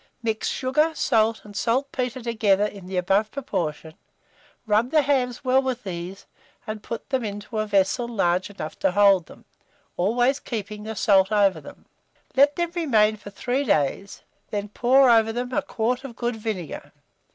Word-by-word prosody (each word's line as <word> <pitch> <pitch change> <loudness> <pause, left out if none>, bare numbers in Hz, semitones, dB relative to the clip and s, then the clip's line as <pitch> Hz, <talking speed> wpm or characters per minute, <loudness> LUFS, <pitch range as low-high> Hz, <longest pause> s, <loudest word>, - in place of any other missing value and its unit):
Mix 220 -1 -1
sugar, 300 +5 +1
salt, 225 0 +1
and 205 -1 -12
saltpetre 250 +3 -1
together 210 -4 +2
in 200 -3 -7
the 185 0 -4
above 195 +4 +2
proportion, 160 - -4 0.7
rub 220 +3 +2
the 305 +1 +3
hams 260 -3 0
well 260 +1 +4
with 260 -2 -3
these, 185 0 -6 0.4
and 215 -1 -5
put 230 +3 -7
them 260 -2 0
into 210 +1 -5
a 215 - -1
vessel 205 +4 +1
large 185 -5 0
enough 175 -6 -7
to - - +1
hold 195 -4 +4
them, - - -16 0.5
always 245 +9 +2
keeping 210 -2 -6
the 220 0 -5
salt 195 -2 +3
over 200 -6 +3
them. - - -13 0.5
Let 285 +2 +5
them 345 -1 -1
remain 220 -11 +3
for 205 - -10
3 245 +7 -2
days, 195 - -1 0.3
then 205 0 -3
pour 260 +5 +4
over 225 -2 +5
them 245 +2 -4
a - - +1
quart 245 +3 -2
of 260 -4 -8
good 240 0 -2
vinegar. 210 -7 -5
220 Hz, 165 wpm, -24 LUFS, 200-250 Hz, 0.7 s, Let